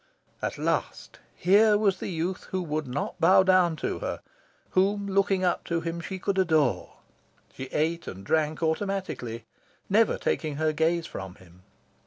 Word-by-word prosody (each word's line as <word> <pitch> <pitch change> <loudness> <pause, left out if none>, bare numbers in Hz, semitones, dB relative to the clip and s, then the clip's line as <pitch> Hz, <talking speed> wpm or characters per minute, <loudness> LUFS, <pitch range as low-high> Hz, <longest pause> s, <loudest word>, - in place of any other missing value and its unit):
At - - -3
last, - - -2 0.2
here 210 +3 +5
was 200 -3 +1
the - - -4
youth 180 +2 -3
who 185 -1 -3
would 155 -3 -3
not 125 +3 -4
bow 190 +3 +6
down 185 -3 +4
to - - -2
her; - - -4 0.5
whom, 200 +2 +2
looking 195 -1 +1
up 180 - +1
to 170 -1 -1
him, 165 +1 -4
she 190 +3 -5
could 190 +1 -1
adore. 155 - +1 0.6
She 130 - -6
ate 160 +5 -1
and 95 +1 -8
drank 155 +5 0
automatically, 160 - -2 0.5
never 220 +2 +4
taking 155 -3 -2
her 155 +1 0
gaze 165 +2 +1
from 95 - -7
him. 90 0 -19
170 Hz, 160 wpm, -27 LUFS, 155-190 Hz, 0.6 s, bow